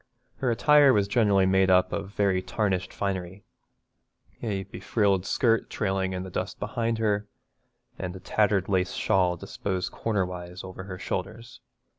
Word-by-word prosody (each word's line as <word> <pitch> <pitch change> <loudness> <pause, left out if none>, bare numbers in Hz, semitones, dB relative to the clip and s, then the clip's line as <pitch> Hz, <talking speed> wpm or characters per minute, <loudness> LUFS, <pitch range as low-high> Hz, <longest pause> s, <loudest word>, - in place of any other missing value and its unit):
Her 130 - 0
attire 145 +3 +5
was 100 -2 +2
generally 100 -3 +3
made 95 0 +3
up 90 0 +4
of 100 -1 -3
very 100 -3 +1
tarnished 95 -2 -1
finery, 95 -1 -4 1.0
a 100 -4 -2
befrilled 100 -1 0
skirt 115 -2 +2
trailing 95 -2 -1
in 90 0 -3
the 95 - -8
dust - - -4
behind 115 -2 -1
her, 105 -2 0 0.7
and 90 0 -4
a - - -8
tattered 100 -1 +1
lace 95 -2 +1
shawl 90 -2 +1
disposed 95 +1 -3
corner 105 -5 -1
wise 90 0 -7
over 95 0 -8
her 95 -2 -7
shoulders. 110 +5 -5
95 Hz, 150 wpm, -27 LUFS, 95-105 Hz, 1.0 s, attire